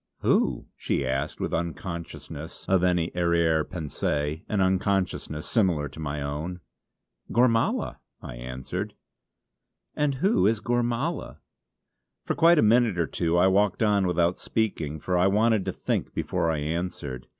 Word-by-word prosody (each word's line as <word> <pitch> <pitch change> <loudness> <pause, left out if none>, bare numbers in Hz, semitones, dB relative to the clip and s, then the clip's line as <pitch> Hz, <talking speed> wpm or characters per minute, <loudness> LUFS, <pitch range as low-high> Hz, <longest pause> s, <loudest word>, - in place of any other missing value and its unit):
"Who?" - - +2
she 70 - -1
asked 70 +3 -2
with - - -3
unconsciousness 80 -2 -5
of 95 -2 +3
any 90 -2 +2
arrière 85 -2 +2
pensée, 75 -1 -2
an 105 - 0
unconsciousness 95 -4 0
similar 90 -10 +1
to 75 - -12
my 75 -2 -3
own. 75 +6 -4 0.7
"Gormala!" 115 -2 +2 0.2
I - - -8
answered. 65 +1 -5 1.0
"And 145 -2 +1
who 195 - +3
is 110 0 +2
Gormala?" 120 +7 -1 0.9
For - - 0
quite 170 +1 +5
a - - +5
minute 115 -2 +4
or 85 - +2
two 85 +1 0
I 90 - +5
walked 100 +3 +3
on 100 -3 +3
without 85 0 +1
speaking, 80 -9 -2
for 90 +4 -1
I 90 - +4
wanted 105 0 +2
to - - -1
think - - -3
before 85 - 0
I 80 - 0
answered. 75 -4 -4
90 Hz, 140 wpm, -26 LUFS, 80-105 Hz, 1.0 s, quite